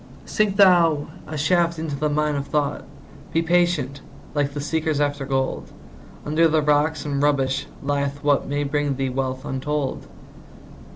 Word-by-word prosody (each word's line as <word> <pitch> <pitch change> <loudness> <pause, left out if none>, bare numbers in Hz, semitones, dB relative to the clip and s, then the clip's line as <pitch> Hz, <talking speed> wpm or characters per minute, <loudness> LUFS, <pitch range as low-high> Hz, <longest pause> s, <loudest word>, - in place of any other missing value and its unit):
Sink 210 -2 0
thou 175 -7 +5 0.2
a 155 0 -5
shaft 170 +3 +2
into 155 -2 -3
the 150 +2 -1
mine 150 0 0
of 140 0 -3
thought; 145 -1 -1 0.5
Be 165 - +2
patient, 165 -5 +1 0.3
like 145 -1 -1
the - - -2
seekers 155 0 -1
after 145 -2 -1
gold; 135 -1 -2 0.5
Under 155 +3 +3
the 155 -1 +2
rocks 150 0 +1
and 140 -1 -1
rubbish 135 -2 +1 0.2
lieth 140 0 -2
what 145 -1 +2
May 145 +1 -1
bring 145 0 -1
thee 135 0 -1
wealth 130 +1 -3
untold. 135 +1 -3
145 Hz, 155 wpm, -23 LUFS, 140-155 Hz, 0.5 s, thou